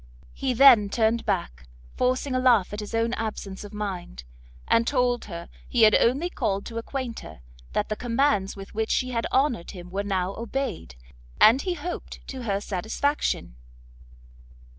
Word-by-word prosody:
He 260 -2 -2
then 235 -6 +7
turned 225 +1 +1
back, 60 +1 -2 0.3
forcing 255 +2 0
a 255 - +1
laugh 235 -7 +3
at 205 - -4
his 210 +1 -5
own 230 +1 +1
absence 210 -4 -4
of 205 - -9
mind, 190 - -5 0.4
and 230 0 +3
told 250 -3 +1
her 170 -4 -7 0.2
he 240 -3 +3
had 215 -1 +7
only 270 +9 +3
called 200 - -2
to 230 0 -5
acquaint 245 -1 -5
her, - - -12 0.3
that 210 - 0
the 215 - -1
commands 235 -4 +1
with 195 -1 -10
which 220 +1 -1
she 255 0 0
had 230 -1 -1
honoured 260 - +1
him 180 -1 -9
were 195 +2 -1
now 190 -2 -1
obeyed, 230 - -4 0.4
and, 235 +5 +7
he 360 +1 -2
hoped, 350 0 -6
to 260 -1 -6
her 200 -4 -1
satisfaction. 205 - -2
225 Hz, 165 wpm, -25 LUFS, 195-255 Hz, 0.4 s, then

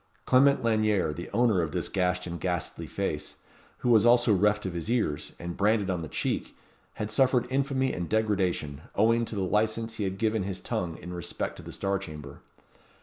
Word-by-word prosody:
Clement 140 +1 +4
Lanyere, 110 -7 +2
the 85 +3 -7
owner 110 -4 +3
of 80 -1 -3
this 90 -2 -1
gashed 90 -1 0
and 85 -1 -5
ghastly 90 -2 -3
face, - - -3 0.5
who - - +3
was 110 -3 +6
also 120 -1 +5
reft 105 +2 +2
of 95 - -3
his 85 +4 -4
ears, 110 -12 -1
and 85 0 -6
branded 105 -1 +2
on 90 -2 -2
the 80 - -5
cheek, - - -3 0.4
had 105 0 -4
suffered 130 +1 +3
infamy 135 -1 +1
and 90 -1 -4
degradation, 95 -9 0
owing 115 +3 +3
to 110 - -6
the 100 - -1
licence 110 +3 0
he 105 - -1
had 95 0 -2
given 110 0 +1
his 95 -1 -3
tongue 85 -2 -3
in 90 - -8
respect 85 -2 -4
to - - -9
the - - -9
Star 100 0 -1
Chamber. 75 -6 -9
100 Hz, 195 wpm, -28 LUFS, 90-115 Hz, 0.5 s, was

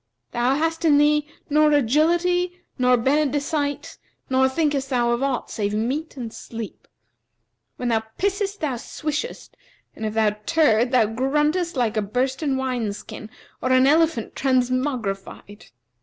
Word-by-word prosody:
Thou 245 +3 +1
hast 325 +2 -1
in 300 -3 +5
thee 300 0 +3 0.2
nor 300 0 +4
agility 345 +7 +2 0.2
nor 250 0 +4
benedicite 285 +2 -1 0.3
nor 265 0 +4
thinkest 280 -1 0
thou 240 -3 +1
of 235 +1 0
aught 275 -3 -1
save 205 -1 -2
meat 275 +8 -2
and 235 -3 -6
sleep. 225 -2 -8 0.9
When 245 - -3
thou 225 -1 +2 0.2
pissest 400 +1 -1
thou 275 -6 -1
swishes"; 305 - -5 0.4
if 215 -1 -4
thou 220 -1 +3 0.2
turd 255 -8 +3
thou 250 -4 +4
gruntest 295 - 0
like 230 -4 0
a - - +2
bursten 265 +6 -1
wine 250 -5 -2
skin 215 +1 -9 0.3
or 255 - 0
an 255 0 +5
elephant 310 -5 +2
transmogrified. 250 -6 -2
265 Hz, 135 wpm, -23 LUFS, 235-305 Hz, 0.9 s, in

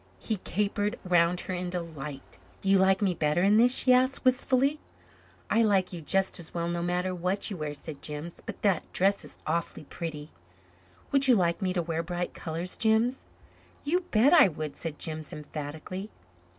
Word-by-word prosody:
He 220 - -3
capered 205 +3 -1
round 175 -1 +2
her 185 - -5
in 180 0 -3
delight. 155 -6 -7 0.2
"You 195 0 +4
like 190 +2 +3
me 190 -3 +2
better 155 +1 +1
in 205 +2 +5
this?" 245 +3 +5
she 255 - +5
asked, 260 +1 +2
wistfully. 260 +3 +2 0.7
"I 230 - +3
like 195 -4 +2
you 170 - -6
just 190 +4 +1
as 170 0 -7
well, 170 0 -1
no 170 0 -2
matter 180 +1 -1
what 185 +4 -2
you 195 - -4
wear," 150 -2 -4
said 145 0 -7
Jims, 150 +3 -5
"but - - -8
that 195 -5 +1
dress 195 +2 +2
is - - -11
awfully 165 0 -2
pretty." 150 0 -7 0.8
"Would 275 -1 +4
you 250 - +6
like 175 -1 +1
me 185 -1 0
to 175 -2 0
wear 165 0 -2
bright 175 +1 -4
colors, 165 +2 -4
Jims?" 225 +3 +1 0.6
"You 330 +5 +1
bet 230 +8 +4
I 310 - +8
would," 155 -4 -5
said 160 -3 -5
Jims 155 -1 -4
emphatically. 150 +6 -6
180 Hz, 180 wpm, -28 LUFS, 165-210 Hz, 0.8 s, I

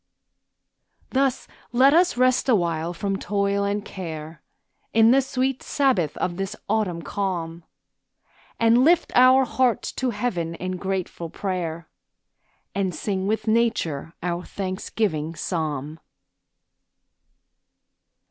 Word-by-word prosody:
Thus 265 -1 +1 0.2
let 260 +4 +5
us 345 -5 +4
rest 255 +1 +3
awhile 170 -6 +1
from 195 +2 -2
toil 200 0 0
and 205 +1 -1
care, 160 -4 -7 0.5
In 225 0 +6
the 270 +2 +5
sweet 265 0 -1
sabbath 250 - +1
of 175 -1 -2
this 195 0 -3
autumn 200 -6 0
calm, 170 -4 -3 1.0
And 230 +2 +5
lift 340 +3 +4
our 255 +1 +6
hearts 255 -2 +1
to 260 - -2
heaven 195 -7 -2
in 185 +1 -4
grateful 185 -3 -3
prayer, 170 -3 -4 0.9
And 190 -4 -1
sing 190 +3 -2
with 220 +2 -1
nature 215 -9 0
our 175 0 -2
thanksgiving 185 -4 -3
psalm. 155 -3 -3
195 Hz, 110 wpm, -24 LUFS, 170-240 Hz, 1.0 s, In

